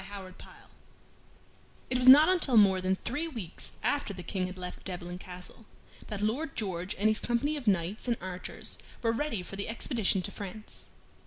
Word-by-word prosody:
CHAPTER 195 -2 -8
28 - - -13 1.4
It 250 - +2
was 250 - +2
not 290 +4 +10
until 335 -10 +3
more 195 -3 +6
than 185 +1 +1
three 285 +11 -3
weeks 225 - -6
after 285 -8 0
the 180 - -7
King 185 -1 -2
had 185 +1 -8
left 180 0 -6
Devlen 180 -1 -5
Castle 185 +4 -10 0.4
that 210 -2 -4
Lord 260 +8 -1
George 185 -3 -2
and 205 +3 +3
his 215 0 +3
company 265 +6 0
of 275 -6 -6
knights 190 +3 +1
and 235 -1 +1
archers 185 0 -5 0.2
were 230 - +3
ready 230 -5 -2
for 195 - -8
the 200 - -3
expedition 225 -5 +1
to 200 - -3
France. 205 +2 -8
205 Hz, 180 wpm, -30 LUFS, 185-240 Hz, 1.4 s, not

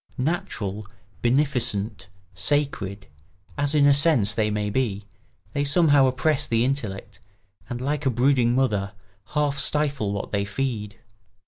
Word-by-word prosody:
Natural, 110 - -3 0.3
beneficent, 120 -6 0 0.3
sacred, 120 -10 -1 0.5
as 145 +1 +1
in 145 -1 +5
a 145 - +6
sense 140 -8 +3
they 110 -1 0
may 105 -1 -2
be, 105 -4 -1 0.5
they 145 - 0
somehow 145 -2 +4
oppress 145 +3 0
the 115 +1 +2
intellect 105 -6 -4 0.5
and, 120 - -4
like 145 +2 -1
a - - +4
brooding 125 0 +2
mother, 105 -6 0 0.4
half 145 -2 +1
stifle 140 -8 0
what 100 -1 -4
they 100 -1 0
feed. 105 -1 -3
125 Hz, 130 wpm, -24 LUFS, 105-145 Hz, 0.5 s, a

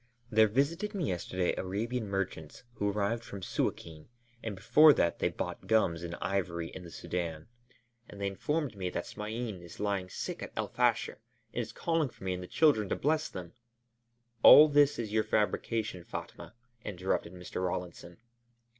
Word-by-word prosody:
There 110 0 +6
visited 165 - 0
me 175 -7 -1
yesterday 90 0 -1
Arabian 110 +5 -2
merchants, 95 -5 -4
who 105 -3 -1
arrived 105 +3 -1
from 100 -4 -8
Suâkin, 80 -3 -3 0.3
and 110 -3 -4
before 125 +10 +7
that 85 - +1
they - - +2
bought - - -5
gums 95 -7 +2
and 85 0 -5
ivory 90 -3 -2
in 95 - -9
the 85 - -10
Sudân, 85 -2 -4 0.6
and 100 - -11
they 100 - -2
informed 140 +7 -2
me 95 -2 -3
that - - -4
Smain 110 -2 -5
is 85 -1 -12
lying 100 -3 -1
sick - - -5
at - - -7
El - - -2
Fasher 120 -3 +1 0.3
and 120 - -1
is 115 -1 -6
calling 165 +2 0
for - - -16
me 95 -1 -1
and 90 - -5
the 90 - -7
children 115 - +3
to - - +1
bless 155 +2 0
them 90 -2 -8 0.4
" 120 0 -45
"All 150 +4 +10
this 145 -1 +4
is 110 -3 -4
your 110 0 +3
fabrication, 105 -2 -1
Fatma," 110 - -8 0.3
interrupted 90 -3 -2
Mr. 90 0 -5
Rawlinson. 85 -1 -4
105 Hz, 170 wpm, -31 LUFS, 90-120 Hz, 0.6 s, All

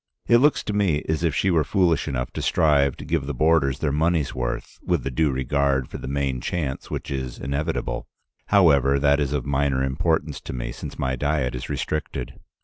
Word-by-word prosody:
It 120 - +6
looks 145 +3 +3
to 105 - -3
me 95 -8 +1
as 80 +1 -1
if 80 -3 +1
she 95 - +2
were 80 -3 +3
foolish 85 0 +1
enough 60 -4 -2
to - - -5
strive 70 -4 +2
to - - -8
give 80 -5 -1
the 75 - -3
boarders 75 -2 +3
their 75 - -1
money's 80 -2 +1
worth, 65 0 -4
with 85 -7 0
the 70 - -3
due 75 +4 +2
regard 65 0 0
for - - -7
the - - -7
main 70 -2 -1
chance 75 -7 -3
which - - -5
is 65 -2 -4
inevitable. 70 -2 -3 0.4
However, 70 -9 +4
that 70 +1 +3
is 70 -2 0
of 75 -4 -1
minor 70 -1 +1
importance 80 +2 0
to - - -7
me, - - -4
since - - -8
my 65 0 -1
diet 70 -1 0
is 65 +1 -6
restricted. 75 -5 -4
70 Hz, 205 wpm, -24 LUFS, 65-80 Hz, 0.4 s, It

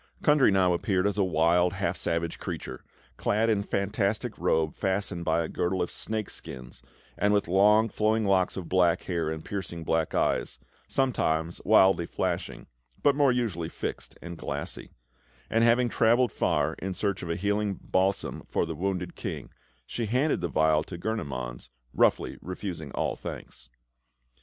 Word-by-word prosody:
Kundry 150 -3 +5
now 95 -2 +3
appeared 95 +2 0
as 105 0 0
a - - +4
wild, 90 +1 +3
half - - -1
savage 85 0 -2
creature, - - -6 0.3
clad 110 +2 +1
in 105 - +2
a - - -2
fantastic 100 +1 -1
robe 80 -1 +1
fastened 95 -3 -2
by 85 0 +1
a - - -3
girdle 90 +3 -1
of 90 - -1
snake 110 -2 -4
skins, 65 -1 -8 0.4
and 105 0 +3
with 100 - +1
long 105 +5 +5
flowing 110 0 +1
locks 95 -2 +2
of 90 -3 -5
black 90 -2 +3
hair 85 -4 -1
and 80 0 -5
piercing 90 -4 -4
black 80 0 0
eyes, - - 0 0.3
sometimes 85 -11 0
wildly 95 -3 +5
flashing 90 -1 -3 0.4
but 145 - +5
more 140 -2 +4
usually 105 -10 -1
fixed - - -6
and 85 -1 -7
glassy; 75 +5 -5 0.6
and 115 +1 +3
having 120 +1 +4
travelled 120 +2 +3
far - - +1
in 95 0 -4
search 100 0 -1
of 85 - -6
a 85 - 0
healing 105 +2 0
balsam 95 +1 0
for - - +1
the 80 - -4
wounded 90 +2 -3
King, - - -6 0.3
she 115 - -3
handed 130 +7 +1
the - - 0
vial 80 -1 +2
to 90 - -7
Gurnemanz, 65 - -4 0.2
roughly - - +2
refusing 90 -5 -6
all - - -1
thanks. 60 - -8
95 Hz, 160 wpm, -28 LUFS, 85-105 Hz, 0.6 s, Kundry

